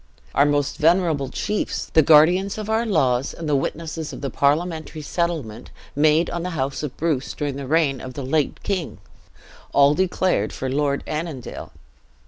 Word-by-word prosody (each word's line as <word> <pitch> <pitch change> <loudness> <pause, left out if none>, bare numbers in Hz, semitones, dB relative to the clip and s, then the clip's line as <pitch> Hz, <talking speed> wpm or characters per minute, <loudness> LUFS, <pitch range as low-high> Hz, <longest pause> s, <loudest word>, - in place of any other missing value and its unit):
Our 140 - +4
most 145 -1 0
venerable 160 -4 +2
chiefs, 210 +8 -3
the 160 - +7
guardians 170 +7 +5
of 215 0 -4
our 225 +1 +1
laws, 135 - +1
and 165 - -6
the 150 - +2
witnesses 160 +2 -3
of - - -8
the 140 -2 -3
parliamentary 155 +2 0
settlement 145 -10 -3 0.3
made 155 +3 +3
on 170 - -3
the 180 - -3
house 135 0 -2
of 150 -4 -5
Bruce 150 -5 -1
during 145 -2 -3
the 140 -1 -6
reign 145 -3 +1
of 130 -1 -8
the 140 - -5
late 145 +2 -1
king, 190 -5 -2 0.8
all 140 +1 +5
declared 180 - 0
for 130 0 -4
Lord 140 0 0
Annandale. 155 -5 -5
150 Hz, 165 wpm, -22 LUFS, 140-170 Hz, 0.8 s, the